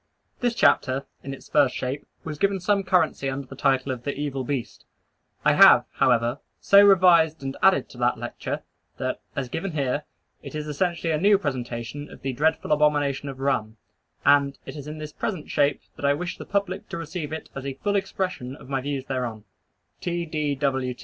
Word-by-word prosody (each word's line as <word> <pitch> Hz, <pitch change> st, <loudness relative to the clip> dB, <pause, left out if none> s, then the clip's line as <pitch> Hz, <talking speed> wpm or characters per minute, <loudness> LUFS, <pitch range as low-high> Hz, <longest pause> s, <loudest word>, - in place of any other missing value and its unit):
This 240 Hz, -1 st, 0 dB
chapter, 135 Hz, -, +3 dB, 0.2 s
in 135 Hz, -, -6 dB
its 135 Hz, -, -9 dB
first 145 Hz, -4 st, +3 dB
shape, 130 Hz, +3 st, -4 dB, 0.2 s
was 150 Hz, -2 st, -6 dB
given 200 Hz, -1 st, +2 dB
some 200 Hz, +2 st, +2 dB
currency 180 Hz, -7 st, +1 dB
under 135 Hz, +1 st, -4 dB
the 135 Hz, -, -11 dB
title 135 Hz, 0 st, +1 dB
of 125 Hz, -2 st, -4 dB
"The 140 Hz, +3 st, -3 dB
Evil 140 Hz, -2 st, -3 dB
Beast." 130 Hz, -2 st, -4 dB, 0.6 s
I -, -, +6 dB
have, -, -, +8 dB
however, 120 Hz, 0 st, +2 dB, 0.2 s
so 200 Hz, 0 st, +7 dB
revised 170 Hz, -6 st, +5 dB
and 135 Hz, 0 st, -4 dB
added 190 Hz, 0 st, +4 dB
to 125 Hz, -, -13 dB
that 120 Hz, 0 st, +2 dB
Lecture, 120 Hz, +1 st, -5 dB, 0.3 s
that, -, -, -3 dB
as 140 Hz, -, -1 dB
here 165 Hz, -, -2 dB
given, 145 Hz, -7 st, -1 dB, 0.4 s
it -, -, -9 dB
is 150 Hz, 0 st, -4 dB
essentially 165 Hz, +2 st, -1 dB
a 155 Hz, -, 0 dB
new 200 Hz, +1 st, +6 dB
presentation 130 Hz, -3 st, -4 dB
of -, -, -14 dB
the 135 Hz, -1 st, -2 dB
dreadful 155 Hz, +4 st, 0 dB
Abomination 145 Hz, -2 st, +2 dB
of 135 Hz, -1 st, -8 dB
Rum, 110 Hz, -5 st, -1 dB, 0.5 s
and 140 Hz, -1 st, +4 dB
it -, -, -8 dB
is 145 Hz, -1 st, -8 dB
in 155 Hz, +1 st, -6 dB
this 155 Hz, -1 st, -7 dB
present 185 Hz, -8 st, -4 dB
shape 145 Hz, -1 st, +2 dB, 0.2 s
that -, -, -4 dB
I 140 Hz, 0 st, +4 dB
wish 180 Hz, +4 st, -5 dB
the -, -, -7 dB
public 200 Hz, -2 st, -2 dB
to -, -, -4 dB
receive 165 Hz, -1 st, -5 dB
it 160 Hz, -, -6 dB
as 135 Hz, -, -6 dB
a 135 Hz, -, -4 dB
full 205 Hz, +9 st, -1 dB
expression 185 Hz, -9 st, -2 dB
of 140 Hz, -, -14 dB
my 135 Hz, -1 st, -1 dB
views 140 Hz, -1 st, -3 dB
thereon. 125 Hz, -5 st, -3 dB
145 Hz, 190 wpm, -25 LUFS, 135-165 Hz, 0.6 s, have